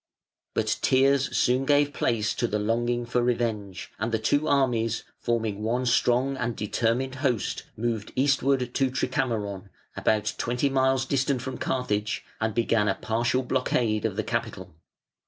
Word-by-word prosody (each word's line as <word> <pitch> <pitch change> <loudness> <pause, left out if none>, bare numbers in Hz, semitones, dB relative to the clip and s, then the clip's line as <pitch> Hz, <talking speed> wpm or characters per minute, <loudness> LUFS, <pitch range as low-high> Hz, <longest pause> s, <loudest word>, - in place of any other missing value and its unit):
But - - 0
tears 135 +1 +3
soon 125 +1 +3
gave 145 +1 +3
place 110 -4 0
to 120 - -1
the 105 - -1
longing 120 +3 0
for 120 +1 0
revenge, 110 -6 -2
and 110 +3 -1
the 110 - +2
two 145 +8 +1
armies, 120 -6 +1 0.2
forming 110 -3 -1
one 120 +4 0
strong 125 +2 +2
and 120 -2 -2
determined 115 +5 0
host, 125 -8 -1
moved 110 -2 -2
eastward 135 -2 +2
to 135 -2 +2
Tricamaron, 110 -7 -2 0.3
about 110 -1 +1
twenty 125 +4 0
miles 130 0 +2
distant 135 -1 0
from 130 -1 -5
Carthage, 110 -5 -1
and 110 -1 -1
began 115 -2 +2
a 95 - +2
partial 120 +3 0
blockade 120 -4 0
of - - -1
the - - -1
capital. - - -4
120 Hz, 150 wpm, -26 LUFS, 110-130 Hz, 0.3 s, tears